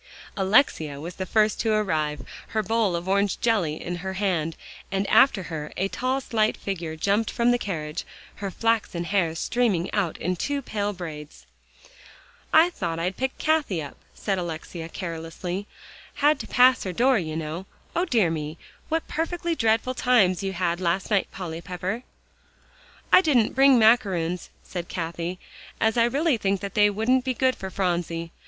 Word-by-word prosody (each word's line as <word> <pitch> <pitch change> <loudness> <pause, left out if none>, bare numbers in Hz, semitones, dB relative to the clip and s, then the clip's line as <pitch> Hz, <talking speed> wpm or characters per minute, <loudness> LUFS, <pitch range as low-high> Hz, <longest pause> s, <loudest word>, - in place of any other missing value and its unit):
Alexia 190 - +2
was 170 +4 -6
the 190 - -4
first 215 +2 +2
to 225 - +1
arrive, 155 -10 0 0.2
her 215 -1 -1
bowl 220 -5 +1
of 170 +2 -4
orange 200 +1 +1
jelly 200 -10 +1
in 175 0 -4
her 190 +2 -4
hand, 180 -5 -1 0.4
and 195 +1 0
after 215 -8 +5
her, 155 -3 -6
a 195 +2 0
tall 255 +5 -1
slight 220 -4 0
figure 170 -5 -4
jumped 200 +7 +1
from 240 0 +2
the 245 - +3
carriage, 155 -5 -4 0.3
her 200 -1 -3
flaxen 220 -4 0
hair 170 -3 0
streaming 195 -2 0
out 195 -6 0
in 180 +2 -1
two 285 - -2
pale 210 -6 -2
braids. 155 -6 -8 1.1
"I 330 +3 +6
thought 170 - -3
I'd 180 +3 -2
pick 265 0 -2
Cathie 295 - +1
up," 145 - -9 0.2
said 195 -3 -1
Alexia 165 -1 -5
carelessly; 175 +3 -5 0.5
"had 295 0 +3
to - - -6
pass 255 0 +5
her 185 - -3
door, 250 +4 +3
you 155 -3 -4
know. 160 +4 -4 0.3
O 345 - +2
dear 225 - +2
me, 155 0 -4 0.3
what 325 +1 -1
perfectly 335 +1 -2
dreadful 225 -2 +1
times 225 -8 +3
you 195 -1 -2
had 175 -1 -1
last 185 +4 0
night, 200 -2 +2
Polly 170 -3 -6
Pepper." 185 +6 -4 1.1
"I - - +9
didn't 255 - +2
bring 270 0 +6
macaroons," 195 -7 +2
said 175 -2 -6
Cathie, 170 +1 -4 0.4
"as 220 -1 +2
I 235 -1 +4
really 280 +3 +1
think 195 -2 0
that 200 -1 -5
they 210 -1 +5
wouldn't 230 +5 +1
be 260 -1 -1
good 260 +1 +2
for 190 - -6
Phronsie. 170 -3 -2
195 Hz, 170 wpm, -25 LUFS, 170-230 Hz, 1.1 s, I